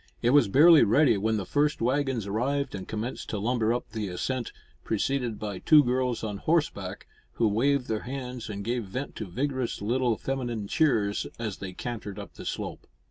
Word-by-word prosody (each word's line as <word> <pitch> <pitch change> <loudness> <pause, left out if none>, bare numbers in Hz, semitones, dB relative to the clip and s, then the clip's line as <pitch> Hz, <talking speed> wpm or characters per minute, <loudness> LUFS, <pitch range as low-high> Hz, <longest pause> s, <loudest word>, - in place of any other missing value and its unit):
It 120 - +4
was 145 -5 +6
barely 155 - +7
ready 120 +4 +4
when 110 +2 0
the 100 - -3
first 150 +7 +1
waggons 130 -2 0
arrived 130 +7 -1
and 95 -2 -6
commenced 110 +4 -4
to 110 - -2
lumber 115 +1 +1
up 120 -2 -3
the 110 -2 -3
ascent, 120 +7 -3 0.3
preceded 120 +1 -1
by 100 -3 -5
two 150 -2 +6
girls 125 -2 0
on 105 -2 -3
horseback, 100 - -1 0.3
who 115 - +2
waved 125 +5 +1
their 110 -1 -1
hands, 125 -2 -6
and 100 -1 -5
gave 120 -1 -1
vent 130 +9 -5
to 110 - -5
vigorous 130 +5 -2
little 120 +2 +1
feminine 120 -6 -3
cheers 110 -8 +1
as 110 -4 -4
they 95 -1 -6
cantered 105 -1 -6
up - - -8
the - - -10
slope. - - -5
120 Hz, 185 wpm, -27 LUFS, 105-135 Hz, 0.3 s, barely